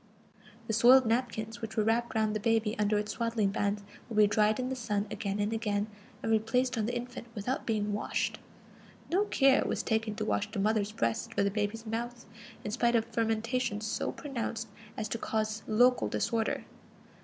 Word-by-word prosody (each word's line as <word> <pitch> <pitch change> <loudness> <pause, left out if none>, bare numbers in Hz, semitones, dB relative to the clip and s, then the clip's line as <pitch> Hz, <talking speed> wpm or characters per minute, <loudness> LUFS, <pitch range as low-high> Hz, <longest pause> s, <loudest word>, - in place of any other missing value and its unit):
The 220 - -2
soiled 245 +4 +7
napkins 225 -1 -1
which 225 0 -6
were 215 - +4
wrapped 230 +2 +1
round 215 -1 +1
the - - 0
baby 225 0 +1
under 210 0 +2
its 210 0 -2
swaddling 230 -4 0
bands 200 +1 -1 0.3
would 220 - -4
be 210 - +8
dried 210 +2 +3
in 255 0 -1
the 265 - -2
sun 210 -4 -1
again 200 -1 -2
and 205 +2 0
again, 210 -2 0 0.4
and 225 - 0
replaced 250 +3 +2
on 220 -2 0
the 245 - -2
infant 245 0 -5
without 235 +6 -2
being 210 -2 0
washed. 205 - -1 0.7
No 390 +4 +3
care 275 -8 +4
was - - -1
taken 220 -1 0
to - - -2
wash 100 -1 0
the - - -6
mother's 210 +1 +1
breast 115 - -1
or 200 - +4
the 200 - +1
baby's 210 +2 -2
mouth, 235 +2 -4 0.4
in 210 - -3
spite 235 +1 +2
of 225 -1 +3
fermentation 225 0 0
so 220 0 -2
pronounced 230 -5 -4 0.3
as 215 - -2
to 230 - -2
cause 215 0 -1
local 245 +3 +4
disorder. 225 -2 -1
220 Hz, 190 wpm, -31 LUFS, 210-235 Hz, 0.7 s, be